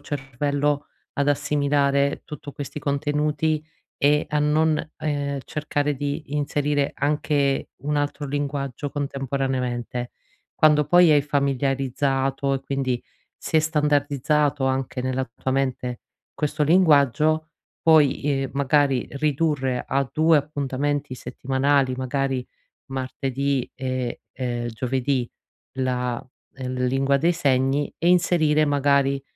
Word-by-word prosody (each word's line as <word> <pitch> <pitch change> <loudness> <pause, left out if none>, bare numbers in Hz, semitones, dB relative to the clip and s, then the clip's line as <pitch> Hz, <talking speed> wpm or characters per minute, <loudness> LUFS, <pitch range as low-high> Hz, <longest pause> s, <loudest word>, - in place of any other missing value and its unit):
cervello 145 +1 -1 0.3
ad 140 0 +1
assimilare 140 -1 +1
tutto 150 -1 -8
questi 145 +1 -6
contenuti 150 +2 0 0.4
e 150 +1 +3
a 150 - 0
non, 155 +1 +1
ehm, 145 -2 -2
cercare 150 -1 -1
di 145 +1 -4
inserire 145 0 0
anche 145 -1 0
un 150 +1 -1
altro 145 0 -2
linguaggio 140 -1 -3
contemporaneamente. 130 -3 -2 0.5
Quando 150 -1 +5
poi 175 +2 +6
hai 145 - +6
familiarizzato, 135 -1 0
e 135 - -2
quindi 135 -3 -2 0.3
si - - -2
è - - +8
standardizzato 150 -2 +1
anche 130 -1 -1
nella 130 0 -2
tua 130 - -3
mente 130 -2 -1 0.3
questo 150 0 -1
linguaggio, 155 -2 +4 0.3
puoi, 155 -4 +5
ehm, 135 -2 0
magari 140 -2 +2
ridurre 140 -3 0
a 135 -1 0
2 160 0 +4
appuntamenti 145 -1 -2
settimanali, 130 +2 0
magari 130 0 -1 0.4
martedì, 135 0 -2
e, 130 -2 -3
ehm, 120 -2 -3
giovedì, 125 +2 -1 0.5
la, 125 -2 -1 0.3
l 130 -1 -3
lingua 135 +2 +2
dei 170 +5 +3
segni 135 -2 +1
e 170 - +1
inserire, 165 -4 +3
magari, 140 -1 +2
140 Hz, 110 wpm, -24 LUFS, 130-150 Hz, 0.5 s, è